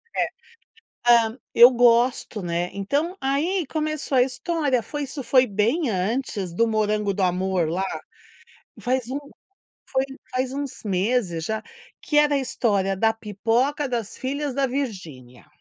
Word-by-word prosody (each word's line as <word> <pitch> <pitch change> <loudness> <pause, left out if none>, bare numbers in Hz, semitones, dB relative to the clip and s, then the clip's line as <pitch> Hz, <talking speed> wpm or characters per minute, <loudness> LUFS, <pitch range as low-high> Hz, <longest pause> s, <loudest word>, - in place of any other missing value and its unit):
É, - - +2 0.6
é. 235 -2 +3
Hã, 225 +4 -7 0.2
eu 240 +2 +9
gosto, 240 -3 +2
né. 175 +1 -2
Então, 285 - -1
aí, 310 +7 0
começou 310 -3 -2
a - - +7
história. 265 0 0
Foi, 295 +3 -4
isso 275 +1 -6
foi 255 0 +4
bem 230 - +1
antes 200 -1 -2
do 230 +6 +2
morango 210 -2 0
do 195 - -1
amor 180 -2 +1
lá. 185 +4 -1 1.0
Faz 255 -1 -1
um 275 +2 -2 0.7
foi 265 0 +1 0.3
faz 255 0 -1
uns 280 -2 -5
meses 190 -3 0
já. 220 0 -2 0.4
Que 295 - -2
era 295 -1 +4
a - - +3
história 215 -8 0
da 225 +3 +3
pipoca 225 +7 0
das 235 -4 -3
filhas 280 +1 -3
da 275 -1 +1
Virginia. 175 - -6
240 Hz, 145 wpm, -24 LUFS, 200-270 Hz, 1.0 s, eu